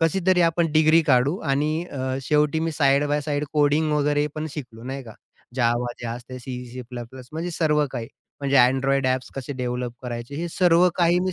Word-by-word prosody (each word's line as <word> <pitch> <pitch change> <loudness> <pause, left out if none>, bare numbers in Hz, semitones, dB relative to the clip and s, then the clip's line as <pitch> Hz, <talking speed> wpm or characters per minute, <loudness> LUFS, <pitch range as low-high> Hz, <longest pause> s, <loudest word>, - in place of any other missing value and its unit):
कशीतरी 180 +2 +2
आपण 165 0 +2
डिग्री 155 +1 +5
काढू 135 +4 +3
आणि 155 +4 0
अ, 130 -1 -3
शेवटी 150 +3 +2
मी 165 0 -1
साइड 140 -1 +3
बाय 145 +1 +1
साइड 145 0 -2
कोडिंग 150 +1 +2
वगैरे 145 0 +2
पण 155 0 -3
शिकलो, 120 -6 -8
नाही 135 +2 -5
का? 110 -4 -12 0.4
Java 120 0 +2
जे 120 - -5
असते, 125 +2 -7
C, 125 0 -6
C++, 125 0 -9
म्हणजे 165 +3 -3
सर्व 150 -3 +2
काही. 120 -3 -5 0.3
म्हणजे 140 -1 +1
Android 135 +1 +1
ॲप्स 130 0 -1
कसे 135 +1 -5
डेव्हलप 125 -2 -3
करायचे, 120 +2 -6
हे 170 +3 -3
सर्व 175 0 +4
काही 175 0 +3
मी 185 0 -1
145 Hz, 185 wpm, -24 LUFS, 125-155 Hz, 0.4 s, डिग्री